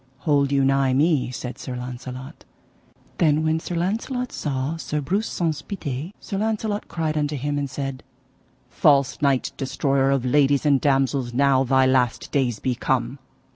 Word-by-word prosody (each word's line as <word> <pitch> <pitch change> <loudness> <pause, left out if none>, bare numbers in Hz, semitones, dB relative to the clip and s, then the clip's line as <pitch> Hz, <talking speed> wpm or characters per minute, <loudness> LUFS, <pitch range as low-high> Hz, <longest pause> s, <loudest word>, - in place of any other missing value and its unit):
Hold 140 -3 +2
you 135 -1 +3
nigh 135 -1 +2
me, 145 -1 +2
said 125 0 -6
Sir 125 - -5
Launcelot. 125 +1 -7 0.8
Then 155 -2 +3
when 160 0 +1
Sir 175 - -5
Launcelot 225 +8 -2
saw 140 +1 -2
Sir 150 -2 -3
Breuse 190 +10 -1
Saunce 160 -4 -1
Pité, 155 -4 -5
Sir 195 -3 -4
Launcelot 215 -1 -1
cried 160 -2 -2
unto 150 0 0
him, 145 +2 -2
and 140 -1 -3
said: 135 -1 -4 0.7
False 140 -4 +2
knight, 140 -3 +2
destroyer 135 0 +1
of 135 -2 +1
ladies 140 +2 +3
and 140 -3 +4
damosels, 135 -3 +1
now 135 0 +4
thy 130 0 +3
last 130 -3 +1
days 130 -6 +1
be 130 +4 -1
come. 130 +2 -1
140 Hz, 160 wpm, -23 LUFS, 130-155 Hz, 0.8 s, and